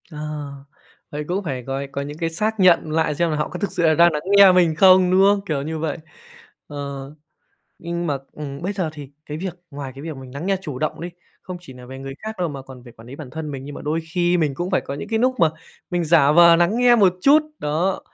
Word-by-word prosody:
Ờ, 150 Hz, -, -9 dB, 0.9 s
vậy 150 Hz, +1 st, -4 dB
cũng 190 Hz, +3 st, -2 dB
phải 130 Hz, -7 st, -4 dB
có 135 Hz, +1 st, -3 dB
có 140 Hz, -, -3 dB
những 145 Hz, +2 st, -7 dB
cái 165 Hz, 0 st, -1 dB
xác 215 Hz, +6 st, -2 dB
nhận 175 Hz, -4 st, +4 dB
lại, 155 Hz, -1 st, 0 dB
xem 170 Hz, +2 st, +1 dB
là -, -, -1 dB
họ 150 Hz, -, -2 dB
có 180 Hz, -, -7 dB
thực 200 Hz, -, -2 dB
sự 175 Hz, -, -2 dB
là 160 Hz, -1 st, +5 dB
đang 170 Hz, +2 st, +5 dB
nắng 150 Hz, -1 st, -3 dB, 0.2 s
nghe 200 Hz, -1 st, +9 dB
mình 175 Hz, -3 st, +3 dB
không, 185 Hz, +1 st, +6 dB
đúng 185 Hz, +1 st, +4 dB
không? 200 Hz, +1 st, +4 dB
Kiểu 150 Hz, -7 st, -2 dB
như 160 Hz, +2 st, -4 dB
vậy. 155 Hz, -2 st, -2 dB, 0.7 s
Ờ, 145 Hz, -, -9 dB, 1.0 s
nhưng 170 Hz, +1 st, -4 dB
mà 145 Hz, -2 st, 0 dB
ừm, 140 Hz, -1 st, -8 dB
bây 190 Hz, +4 st, -2 dB
giờ 185 Hz, -5 st, -2 dB
thì 145 Hz, -3 st, -10 dB
cái 150 Hz, -, -6 dB
việc 185 Hz, +1 st, -4 dB, 0.2 s
ngoài 140 Hz, -2 st, -6 dB
cái 135 Hz, -, -9 dB
việc 160 Hz, 0 st, -6 dB
mình 130 Hz, -1 st, -11 dB
nắng 140 Hz, +6 st, -6 dB
nghe 195 Hz, 0 st, +1 dB
chủ 145 Hz, -8 st, -6 dB
động 155 Hz, -, -3 dB
đi, 175 Hz, -, -5 dB, 0.3 s
không 185 Hz, -1 st, -7 dB
chỉ 155 Hz, -7 st, -12 dB
nà 125 Hz, 0 st, -12 dB
về 130 Hz, +1 st, -9 dB
người 135 Hz, 0 st, -7 dB
khác 220 Hz, +1 st, -6 dB
đâu 175 Hz, -2 st, 0 dB
mà 140 Hz, -2 st, -7 dB
còn 130 Hz, -1 st, -13 dB
về 120 Hz, -, -13 dB
quản 115 Hz, 0 st, -16 dB
lý 130 Hz, -, -9 dB
bản 145 Hz, -3 st, -9 dB
thân 155 Hz, +1 st, -6 dB
mình, 135 Hz, -2 st, -6 dB
nhưng 145 Hz, 0 st, -8 dB
mà -, -, -8 dB
đôi 155 Hz, +2 st, -1 dB
khi 175 Hz, 0 st, +2 dB
mình 155 Hz, -4 st, 0 dB
cũng 175 Hz, +4 st, -4 dB
phải 185 Hz, -, +2 dB
có -, -, -6 dB
những 140 Hz, -, -7 dB
cái 225 Hz, -1 st, 0 dB
núc 255 Hz, +2 st, +1 dB
mà 165 Hz, -2 st, +5 dB, 0.4 s
mình 175 Hz, -1 st, -1 dB
giả 150 Hz, -3 st, +5 dB
vờ 170 Hz, +1 st, +7 dB
nắng 175 Hz, +6 st, +2 dB
nghe 245 Hz, 0 st, +5 dB
một 195 Hz, -6 st, +4 dB
chút, 285 Hz, +6 st, +6 dB, 0.2 s
đó, 165 Hz, +6 st, -1 dB
160 Hz, 270 wpm, -21 LUFS, 145-180 Hz, 1.0 s, nghe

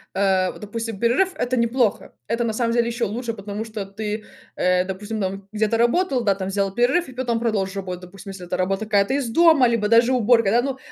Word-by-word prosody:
э, 190 Hz, -1 st, +2 dB
вот -, -, -13 dB
допустим 225 Hz, 0 st, -5 dB
перерыв 250 Hz, -, +2 dB
это 250 Hz, +1 st, -1 dB
неплохо, 235 Hz, -2 st, 0 dB
это 230 Hz, +1 st, 0 dB
на 230 Hz, -, 0 dB
самом 230 Hz, +1 st, 0 dB
деле 235 Hz, 0 st, +2 dB
ещё 235 Hz, 0 st, -1 dB
лучше, 230 Hz, +3 st, -4 dB
потому 205 Hz, 0 st, -6 dB
что 215 Hz, -3 st, -6 dB
ты, 210 Hz, +2 st, -5 dB, 0.3 s
э, 180 Hz, 0 st, +2 dB
допустим, 205 Hz, +3 st, -5 dB
там 195 Hz, +1 st, -4 dB
где-то 215 Hz, +1 st, +1 dB
работал, 250 Hz, +3 st, +2 dB
да 200 Hz, -2 st, +3 dB
там 190 Hz, -1 st, -4 dB
взял 195 Hz, 0 st, -1 dB
перерыв, 265 Hz, +8 st, +2 dB
и 260 Hz, -, -11 dB
потом 240 Hz, -2 st, -1 dB
продолжил 200 Hz, -4 st, -1 dB
работать, 180 Hz, -1 st, -6 dB
допустим, 195 Hz, +2 st, -10 dB
если 185 Hz, -2 st, -9 dB
это 180 Hz, +1 st, -3 dB
работа 195 Hz, +3 st, -1 dB
какая-то 205 Hz, +2 st, +2 dB
из 275 Hz, -4 st, -1 dB
дома 320 Hz, +1 st, +5 dB
либо 230 Hz, -3 st, +1 dB
даже 230 Hz, +3 st, +4 dB
уборка, 230 Hz, -3 st, +3 dB
да. 235 Hz, +2 st, +4 dB
Ну, 270 Hz, +1 st, -3 dB
220 Hz, 220 wpm, -22 LUFS, 195-240 Hz, 0.3 s, дома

